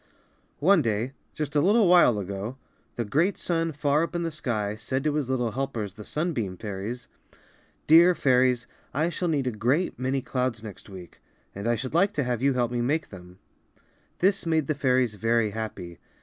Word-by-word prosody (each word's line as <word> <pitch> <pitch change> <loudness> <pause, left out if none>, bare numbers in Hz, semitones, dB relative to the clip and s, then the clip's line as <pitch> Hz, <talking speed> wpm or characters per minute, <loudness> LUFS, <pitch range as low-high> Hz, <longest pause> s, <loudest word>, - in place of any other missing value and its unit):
One 185 +2 +4
day, 115 +1 -1 0.2
just 150 -1 -4
a 145 - +4
little 205 +4 +4
while 175 -11 +6
ago, 100 +5 -5 0.4
the 120 - -2
great 165 - +1
sun 165 -1 -1
far 145 0 +1
up 170 +1 -3
in 170 - -1
the 165 - -2
sky 110 -9 -2
said 130 +5 -3
to 150 -1 +1
his 145 -4 -1
little 125 -3 0
helpers, 115 -6 -3
the 105 - -10
sunbeam 120 - -2
fairies, 105 +4 -6 0.8
^^Dear 170 +2 +7
Fairies, 125 -4 +3 0.3
I 160 +4 +1
shall 175 +2 -2
need 145 -5 0
a 125 - 0
great 125 - 0
many 130 +1 -1
clouds 125 -4 -2
next 105 -1 -10
week; 90 -3 -12 0.3
and 100 +3 -5
I 120 - +2
should 130 +4 -5
like 195 +5 +3
to 145 - 0
have 125 -2 -2
you 140 0 +3
help 120 -1 0
me 120 -1 -1
make 150 +6 -1
them/^ 90 -2 -12 0.8
This 195 -1 +1
made 160 -2 +2
the 155 - 0
fairies 130 -4 +1
very 115 +1 +1
happy. 100 -6 -6
130 Hz, 190 wpm, -26 LUFS, 110-155 Hz, 0.8 s, ^^Dear